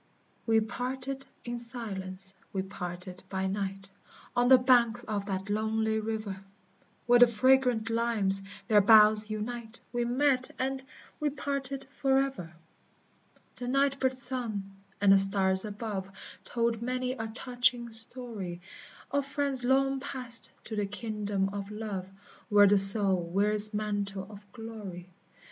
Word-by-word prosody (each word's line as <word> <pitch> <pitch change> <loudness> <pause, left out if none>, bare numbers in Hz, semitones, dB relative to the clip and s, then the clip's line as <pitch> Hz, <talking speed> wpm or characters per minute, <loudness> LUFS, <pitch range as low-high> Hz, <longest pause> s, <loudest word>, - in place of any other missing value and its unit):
We 225 -1 +3
parted 260 +4 -5 0.2
in 240 0 -5
silence, 195 -5 -7 0.2
we 190 -1 -3
parted 180 -1 -8
by 190 0 -3
night, 195 0 -5 0.4
On 245 0 +2
the 260 0 +7
banks 245 -2 +2
of 205 -3 -4
that 190 -1 -4
lonely 220 +1 -1
river; 215 -3 -5 0.6
Where 245 0 +4
the 245 - +8
fragrant 250 0 +2
limes 225 -4 +1 0.3
their 210 -2 +4
boughs 215 0 +5
unite, 225 +2 -6
We 240 0 -1
met 255 +1 0
and 265 +1 -3 0.4
we 300 - 0
parted 275 -1 -3
forever! 270 - -1 1.1
The 245 - -6
night 275 +1 0
bird 260 -1 0
sung, 230 -7 -2 0.2
and 200 -1 +4
the 195 - +6
stars 195 0 +4
above 205 -2 -6 0.4
Told 235 -1 -2
many 255 +1 -3
a 225 -3 -5
touching 245 +1 0
story, 225 -6 -3 0.5
Of 280 0 -1
friends 275 -2 -2
long 270 +1 +1
passed 255 -3 -1
to 220 - -7
the 205 -1 -2
kingdom 205 -2 -3
of 200 0 -7
love, 210 -3 -6 0.4
Where 205 -1 +6
the 200 0 +5
soul 195 -2 +9
wears 205 +5 +4
its 215 - -9
mantle 205 -2 -3
of 205 -1 -15
glory. 210 -6 -10
220 Hz, 135 wpm, -28 LUFS, 200-250 Hz, 1.1 s, soul